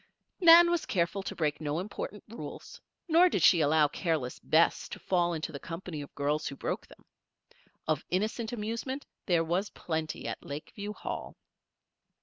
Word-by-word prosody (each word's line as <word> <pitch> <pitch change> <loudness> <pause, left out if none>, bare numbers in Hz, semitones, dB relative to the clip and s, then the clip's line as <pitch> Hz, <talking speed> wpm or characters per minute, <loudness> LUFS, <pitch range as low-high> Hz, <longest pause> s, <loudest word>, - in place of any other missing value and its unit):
Nan 345 -1 +9
was 345 -2 0
careful 180 +1 0
to - - -5
break 150 -2 -1
no 150 0 -1
important 205 +2 -5
rules, 230 +2 -9 0.3
nor 345 +2 +6
did - - 0
she 170 -4 +7
allow 150 0 +4
careless 150 -5 -2
Bess 165 +2 +2
to - - -6
fall 175 -2 +1
into 160 0 -3
the 140 - -7
company 165 0 -6
of 145 - -11
girls 145 +2 0
who 140 - -5
broke - - -3
them. - - -18 0.8
Of 155 -2 0
innocent 220 +5 -1
amusement 235 +5 -4 0.2
there 170 -3 +3
was 180 +5 -1
plenty 160 -2 -4
at - - -5
Lakeview 200 +8 -6
Hall. - - -6
175 Hz, 160 wpm, -30 LUFS, 155-215 Hz, 0.8 s, Nan